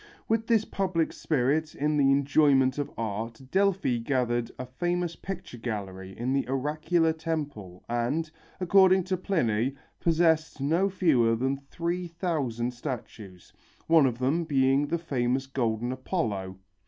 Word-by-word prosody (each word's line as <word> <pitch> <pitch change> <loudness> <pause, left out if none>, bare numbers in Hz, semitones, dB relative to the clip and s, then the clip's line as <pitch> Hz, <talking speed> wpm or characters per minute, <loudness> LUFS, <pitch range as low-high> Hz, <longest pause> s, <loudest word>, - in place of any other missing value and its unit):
With 225 0 0
this 225 -2 +3
public 185 -4 -1
spirit 155 +2 0
in 150 +1 0
the 140 -2 +4
enjoyment 135 -1 +3
of 145 - -2
art 110 +1 -4
Delphi 195 -10 +2
gathered 120 -1 0
a 130 - -5
famous 175 +6 -2
picture 180 -10 -7
gallery 95 -4 -5
in 125 +3 -1
the 135 -3 0
oracular 155 +5 +1
temple 145 - -5
and, 125 +7 -1 0.3
according 190 0 +5
to 185 +1 -1
Pliny, 135 - 0 0.2
possessed 160 -2 +2
no 165 +8 +2
fewer 140 -12 +3
than 130 +4 0
three 170 +5 -4
thousand 145 -9 -2
statues, 115 - -8 0.3
one 160 -4 +5
of 120 -2 -2
them 135 +7 +1
being 135 -1 +2
the 170 - 0
famous 130 -5 -1
golden 120 -3 -1
Apollo. 110 - -3
140 Hz, 135 wpm, -28 LUFS, 120-165 Hz, 0.3 s, according